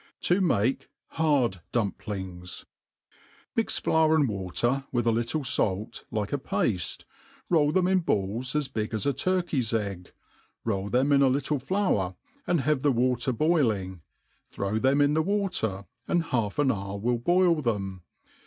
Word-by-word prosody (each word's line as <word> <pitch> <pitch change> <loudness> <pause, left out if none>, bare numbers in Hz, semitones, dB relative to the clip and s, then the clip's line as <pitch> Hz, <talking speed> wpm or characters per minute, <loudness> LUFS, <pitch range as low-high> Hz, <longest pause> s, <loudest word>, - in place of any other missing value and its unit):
id 180 - +5
mM 130 - +2 0.4
hdtd 140 - +2
DmpHngh 95 -5 -4 0.9
MtX - - 0
lour 160 0 +4
and 150 -3 +3
water,, 110 +6 -1
with 120 -2 0
a 115 - +4
little 120 +7 -1
fait, 105 -5 -1
like 105 0 -3
a 145 - 0
pafte^ 95 -8 -1 0.4
foil 150 -4 +3
them 185 +2 +2
in 190 0 +3
balli, 115 - -1
as 150 -2 +1
big 110 -1 -3
as 110 - -2
a 140 - +2
tiirkey^s 140 -7 0
egg, 100 -4 -6 0.5
roll 100 -3 -1
them 130 +6 +2
in 140 -1 +5
a 135 - +5
littld 140 +1 0
flour, 135 - 0 0.3
have 150 -5 +1
the 145 - +3
water 125 0 +1
boilings 115 - +1 0.5
throw 100 +2 -2
them 135 +4 +3
in 145 +1 +3
the 160 - +3
watery 180 - -1 0.2
and 175 -1 +2
half 110 -2 0
an 145 -3 +3
hour 100 -2 -4
will 120 +3 0
boil 175 +3 +3
them. 100 -7 -2
125 Hz, 155 wpm, -27 LUFS, 100-150 Hz, 0.9 s, id